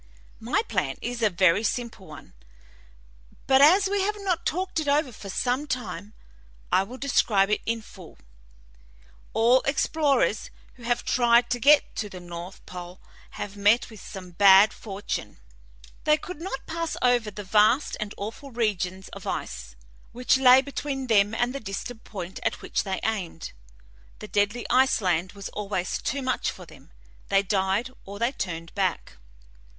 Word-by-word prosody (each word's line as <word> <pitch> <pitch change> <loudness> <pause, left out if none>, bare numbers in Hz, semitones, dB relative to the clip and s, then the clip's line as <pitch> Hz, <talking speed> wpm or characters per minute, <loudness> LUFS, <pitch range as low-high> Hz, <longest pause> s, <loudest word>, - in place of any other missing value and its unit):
"My - - 0
plan 135 - -2
is 240 0 -4
a 215 - +4
very 185 +2 +3
simple 225 -3 -3
one, 150 -10 -12 1.1
but 265 0 +5
as 370 +7 +6
we 400 0 0
have 415 +2 -1
not 355 -4 -1
talked 365 0 -1
it 310 - -3
over 285 -1 +2
for 205 -3 -10
some 255 +8 -1
time, 210 -6 -5 0.6
I - - +4
will 230 +7 -7
describe 210 -7 +2
it 210 - +1
in 230 -1 -1
full. 185 -5 -14 1.2
All 240 +3 +4
explorers 275 -5 +1 0.2
who 250 - -19
have 240 +1 -1
tried 240 0 +3
to 245 - 0
get 290 +4 +5
to 210 - -3
the 185 - -9
north 175 +1 -9
pole 180 0 -9 0.4
have 205 0 -5
met 205 +4 +3
with 215 -3 -12
the - - -11
same 185 -2 -9
bad 195 +3 +7
fortune. 200 -2 -5 0.7
They 305 0 +5
could 330 +1 -9
not 335 -7 -5
pass 330 0 -3
over 245 -3 +3
the 210 0 -8
vast 215 +7 +3
and 210 -1 -5
awful 225 +7 -7
regions 190 -6 -2
of - - -10
ice - - -5 0.4
which 250 +2 +2
lay 260 0 +7
between 275 -1 -4
them 210 -2 +3
and 240 +2 0
the 275 - -4
distant 220 +2 -6
point 190 -3 -7
at - - -2
which - - -1
they 190 -1 -3
aimed; 190 -7 -3 0.6
the 210 - -9
deadly 205 +4 0
ice 260 +2 +3
land 180 -2 0
was 200 -1 -7
always 195 -3 -3
too 275 +2 -2
much 255 0 0
for - - -9
them; - - -17 0.4
they 195 0 +3
died 195 +5 0
or 200 +1 -9
they 235 +4 +1
turned 165 -9 -5
back. 185 - -2
220 Hz, 165 wpm, -26 LUFS, 195-260 Hz, 1.2 s, bad